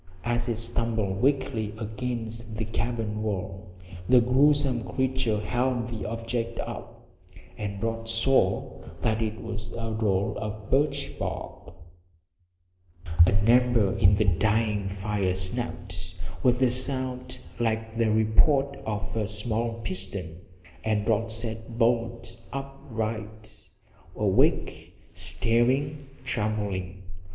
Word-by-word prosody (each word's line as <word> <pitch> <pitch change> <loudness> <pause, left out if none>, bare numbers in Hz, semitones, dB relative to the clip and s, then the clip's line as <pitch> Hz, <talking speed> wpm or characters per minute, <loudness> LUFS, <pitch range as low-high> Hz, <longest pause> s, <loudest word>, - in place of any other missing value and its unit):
As 120 0 +1
it 115 - +1
stumbled 110 -3 -1
weakly 125 -6 +1
against 115 0 -4
the 110 0 -1
cabin 110 -1 -2
wall 95 -2 -3 0.4
the 125 0 +8
gruesome 135 0 +3
creature 130 -1 0
held 125 +1 0
the 110 -3 -4
object 115 +1 -3
up, 120 0 -7 0.5
and 100 0 -4
Rod 115 0 -2
saw 115 -4 +2 0.2
that 110 +5 +1
it 110 0 -2
was 110 -4 -5
a 115 -1 -3
roll 100 -3 0
of 105 -1 -6
birch 140 0 +1
bark! - - -5 1.5
An 100 +2 +2
ember 120 -5 +4
in 95 0 +5
the 105 +2 +2
dying 105 +2 +2
fire 100 -1 -1
snapped 95 -3 -4 0.3
with 125 -1 +3
a 125 - +4
sound 130 0 -2 0.2
like 110 -1 -1
the 115 -1 +2
report 110 +6 +3
of 110 0 -3
a 110 -2 0
small 115 +2 -1
pistol 95 -2 -3 0.6
and 105 -2 0
Rod 115 0 +2
sat 115 0 -3
bolt 115 0 +1
upright, 110 -5 -5 0.5
awake, - - +1 0.2
staring, 135 +5 +2 0.2
trembling. 105 -6 -2
115 Hz, 110 wpm, -27 LUFS, 105-120 Hz, 1.5 s, the